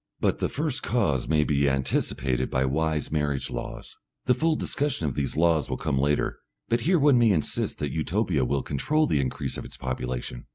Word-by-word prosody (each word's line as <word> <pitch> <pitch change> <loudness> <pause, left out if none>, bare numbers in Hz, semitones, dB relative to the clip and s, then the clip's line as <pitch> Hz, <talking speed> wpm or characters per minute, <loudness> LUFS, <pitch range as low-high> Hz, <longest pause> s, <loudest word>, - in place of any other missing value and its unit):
But - - +1
the - - 0
first 145 -2 -2
cause 100 - 0
may 75 -1 +3
be 70 -1 +2
anticipated 65 -1 0
by 65 +1 +1
wise 75 +2 0
marriage 75 -3 -1
laws.... - - -6 0.3
The 125 - +4
full 160 +5 +1
discussion 145 - -1
of 70 - -1
these 70 +2 -2
laws 80 -2 +3
will - - -2
come 65 - -1
later, 75 +2 +1 0.3
but 115 +1 +2
here 175 +8 +3
one 140 -4 +5
may 115 -1 +5
insist 80 -7 0
that 75 -2 -3
Utopia 80 - 0
will 70 +2 0
control 155 - +1
the 75 - +1
increase 65 - -3
of - - -6
its - - -10
population. 60 -1 -4
75 Hz, 195 wpm, -26 LUFS, -, 0.3 s, one